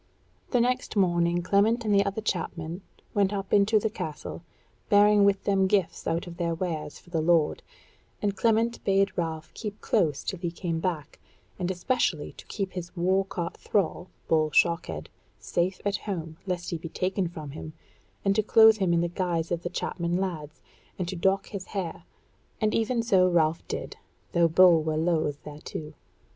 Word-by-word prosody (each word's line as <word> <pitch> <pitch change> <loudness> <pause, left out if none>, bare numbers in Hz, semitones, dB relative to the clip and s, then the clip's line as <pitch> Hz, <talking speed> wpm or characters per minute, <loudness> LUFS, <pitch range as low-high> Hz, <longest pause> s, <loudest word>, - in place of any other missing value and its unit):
The 250 - +2
next 250 +1 0
morning 175 -2 +2
Clement 215 +5 +2
and 210 - +2
the 200 0 +5
other 200 +2 -3
chapmen 175 -3 -3 0.3
went 200 -1 +2
up 195 -2 -4
into 210 +2 +5
the 215 0 0
Castle, 155 -4 -6 0.5
bearing 205 0 +6
with 200 -1 +2
them 195 -1 +2
gifts 185 -4 0
out 165 +1 0
of 170 -1 -9
their 170 -1 -1
wares 160 -4 -4
for 175 - -19
the 165 -2 0
lord, 165 -2 +2 0.6
and 200 -1 -1
Clement 230 +2 +1
bade 195 0 +2
Ralph 160 -2 -3
keep 210 -2 -6
close 150 -4 +1
till 190 - -4
he 175 - -2
came 170 -1 -3
back, 165 -4 -3 0.4
and 180 -1 -1
especially 185 - 0
to - - -14
keep 195 -3 -3
his 175 -1 -7
war 190 +3 +2
caught 175 -3 -4
thrall, 185 -2 -1 0.2
Bull 155 -1 +3
Shockhead, 150 - +1 0.3
safe 180 +2 -1
at 205 0 +1
home, 165 -6 -5
lest 180 -1 -3
he 170 - -2
be 165 - -7
taken 185 +2 -1
from 155 -4 -8
him, 155 +1 -8 0.5
and 195 0 +3
to 215 - +4
clothe 220 +1 +6
him 190 -4 +1
in 170 - +3
the 175 - +1
guise 170 -2 -2
of 170 -1 -1
the 175 - -3
chapman 175 0 -2
lads, 165 -5 -4 0.3
and 180 - -2
to 190 - -4
dock 195 +3 +1
his 195 -3 -6
hair; 175 -4 -4 0.5
and 215 -1 +1
even 230 +1 +1
so 190 -5 +4
Ralph 165 -2 +2
did, - - -5 0.3
though 170 0 +4
Bull 170 0 +6
were 155 0 -1
loath 160 -3 0
thereto. 150 +1 -7
180 Hz, 180 wpm, -27 LUFS, 165-200 Hz, 0.6 s, bearing